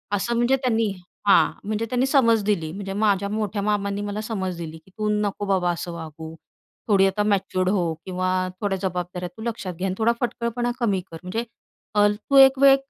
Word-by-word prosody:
असं 235 +4 -1
म्हणजे 240 +3 +3
त्यांनी 230 -5 0 0.4
हां. 200 - +6 0.2
म्हणजे 215 +1 -1
त्यांनी 250 +1 +1
समज 230 -6 +4
दिली 175 -7 0
म्हणजे 195 +1 -5
माझ्या 200 -1 +1
मोठ्या 210 -1 -2
मामांनी 200 -1 -1
मला 205 +1 -3
समज 190 -5 -3
दिली 160 -1 -6
की 160 +4 -21
"तू 215 0 -1
नको 205 0 -2
बाबा 185 -3 +1
असं 175 +1 -5
वागू 160 -1 -8 0.5
थोडी 195 -3 +5
आता 195 +2 0
मॅच्युअर्ड 190 -2 +1
हो, 175 -5 +1
किंवा 185 0 -1
थोड्या 200 -2 0
जबाबदाऱ्या 180 -1 -3
तू - - -9
लक्षात 220 -6 -4
घे 190 - -1
आणि 185 - -1
थोडा 225 +1 +3
फटकळपणा 240 0 -1
कमी 205 -6 +1
कर. 165 - -7
म्हणजे 190 +6 -2 0.9
तू 275 - +2
1 270 0 +8
वेळ 275 0 +8
200 Hz, 185 wpm, -24 LUFS, 185-225 Hz, 0.9 s, 1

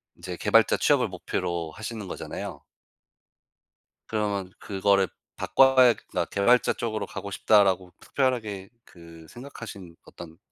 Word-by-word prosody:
인제 90 0 -7
개발자 - - +3
취업을 - - +3
목표로 85 -3 -4
하시는 110 +2 -7
거잖아요. - - -7 1.5
그러면 100 -4 -2
그거를 100 -1 +1 0.3
바꿔야 130 -2 +5
그러니까 - - -4
'개발자 120 +5 +3
쪽으로 110 -2 -3
가고 100 - -7
싶다.'라고 95 -3 +3
특별하게 110 -8 -2 0.2
그 85 -2 -15
생각 130 0 -11
하신 90 -6 -9
어떤 80 -1 -12
100 Hz, 310 characters per minute, -26 LUFS, 90-115 Hz, 1.5 s, 바꿔야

